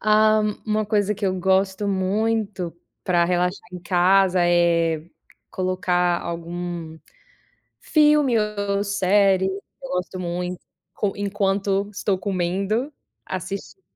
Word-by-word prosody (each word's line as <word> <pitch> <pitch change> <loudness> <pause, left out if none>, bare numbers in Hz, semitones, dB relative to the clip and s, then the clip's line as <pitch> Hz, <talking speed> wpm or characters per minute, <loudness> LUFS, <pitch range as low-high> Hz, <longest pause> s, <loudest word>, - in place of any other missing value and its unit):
Ha. 215 0 +4 0.3
Uma 215 0 +1
coisa 210 -1 +1
que 200 - -2
eu 185 - 0
gosto 190 +2 +1
muito 200 -1 -1 0.3
para 175 -2 +3
relaxar 180 +2 -1
em 180 - -6
casa, 185 +1 +3
é 170 -2 +2 0.5
colocar 180 -1 0
algum 170 -1 -5 0.8
filme 300 -5 +3
ou 205 -1 -1
série, 195 -1 +3
eu 190 +1 -4 0.3
gosto 180 +1 -3
muito, 180 0 -3 0.6
enquanto 200 0 0
estou 200 -1 -1
comendo, 195 - -1 0.3
assistindo, 190 - -6
190 Hz, 105 wpm, -23 LUFS, 180-205 Hz, 0.8 s, Ha